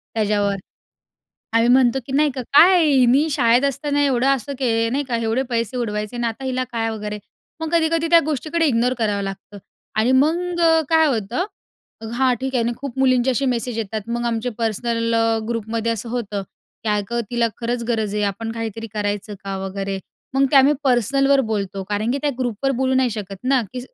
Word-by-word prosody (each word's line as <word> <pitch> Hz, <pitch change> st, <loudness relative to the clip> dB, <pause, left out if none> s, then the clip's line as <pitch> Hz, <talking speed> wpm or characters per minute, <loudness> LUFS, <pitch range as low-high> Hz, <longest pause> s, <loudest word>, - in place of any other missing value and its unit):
त्याच्यावर. 205 Hz, -2 st, +1 dB, 1.0 s
आम्ही 230 Hz, +1 st, +4 dB
म्हणतो, 255 Hz, 0 st, +4 dB
की 265 Hz, -, -6 dB
नाही 295 Hz, +2 st, +3 dB
का 260 Hz, -, -4 dB
"काय 345 Hz, +4 st, +7 dB
हिनी 270 Hz, +1 st, +4 dB
शाळेत 245 Hz, -2 st, +3 dB
असताना 285 Hz, +1 st, 0 dB
एवढं 260 Hz, -2 st, +1 dB
असं 275 Hz, 0 st, 0 dB
के 230 Hz, -3 st, +1 dB
नाही 280 Hz, +4 st, -1 dB
का? 240 Hz, -, 0 dB
एवढे 230 Hz, +2 st, 0 dB
पैसे 235 Hz, +1 st, -1 dB
उडवायचे 210 Hz, -1 st, -3 dB
आणि 240 Hz, 0 st, -1 dB
आता 230 Hz, +4 st, -4 dB
हिला 255 Hz, -1 st, -1 dB
काय" 225 Hz, -1 st, -1 dB
वगैरे. 210 Hz, -1 st, -5 dB, 0.4 s
मग 320 Hz, -1 st, -3 dB
कधी-कधी 330 Hz, 0 st, +2 dB
त्या 340 Hz, -, +8 dB
गोष्टीकडे 310 Hz, +3 st, 0 dB
इग्नोर 250 Hz, -2 st, +2 dB
करावं 205 Hz, -3 st, 0 dB
लागतं 195 Hz, +1 st, -7 dB, 0.4 s
आणि 230 Hz, +4 st, +3 dB
मग 340 Hz, +6 st, +1 dB, 0.3 s
काय 320 Hz, -1 st, +4 dB
होतं, 235 Hz, -, -1 dB, 0.7 s
हां 255 Hz, 0 st, +3 dB
ठीक 265 Hz, 0 st, -3 dB
आहे 240 Hz, -, +2 dB
ना 235 Hz, -, 0 dB
खूप 270 Hz, 0 st, -7 dB
मुलींचे 255 Hz, -1 st, +3 dB
असे 270 Hz, +2 st, 0 dB
मेसेज 235 Hz, -1 st, -3 dB
येतात 215 Hz, 0 st, -4 dB
मग 240 Hz, -, -3 dB
आमचे 230 Hz, +2 st, -2 dB
पर्सनल 230 Hz, +1 st, -1 dB
अ, 225 Hz, 0 st, +2 dB
ग्रुपमध्ये 230 Hz, 0 st, -2 dB
असं 230 Hz, +1 st, -5 dB
होतं, 210 Hz, -4 st, -3 dB, 0.4 s
की 225 Hz, -, -3 dB
"अगं 210 Hz, +4 st, -2 dB
तिला 235 Hz, -1 st, +1 dB
खरंच 235 Hz, +1 st, -2 dB
गरज 220 Hz, -3 st, -1 dB
आहे. 210 Hz, -, 0 dB
आपण 225 Hz, +3 st, -6 dB
काहीतरी 225 Hz, 0 st, -5 dB
करायचं 205 Hz, 0 st, -3 dB
का?" 195 Hz, -1 st, -3 dB
वगैरे, 195 Hz, 0 st, -4 dB, 0.4 s
मग 270 Hz, 0 st, +4 dB
ते 285 Hz, -, +4 dB
आम्ही 270 Hz, +2 st, +7 dB
पर्सनलवर 275 Hz, +2 st, +3 dB
बोलतो 195 Hz, -2 st, -3 dB
कारण 210 Hz, +2 st, -1 dB
की 280 Hz, -, -1 dB
त्या 295 Hz, -, +1 dB
ग्रुपवर 250 Hz, +1 st, -1 dB
बोलू 260 Hz, 0 st, +1 dB
नाही 260 Hz, -1 st, +2 dB
शकत 205 Hz, -3 st, -6 dB
ना, 260 Hz, -1 st, +3 dB
की 250 Hz, -, -4 dB
240 Hz, 190 wpm, -21 LUFS, 220-270 Hz, 1.0 s, त्या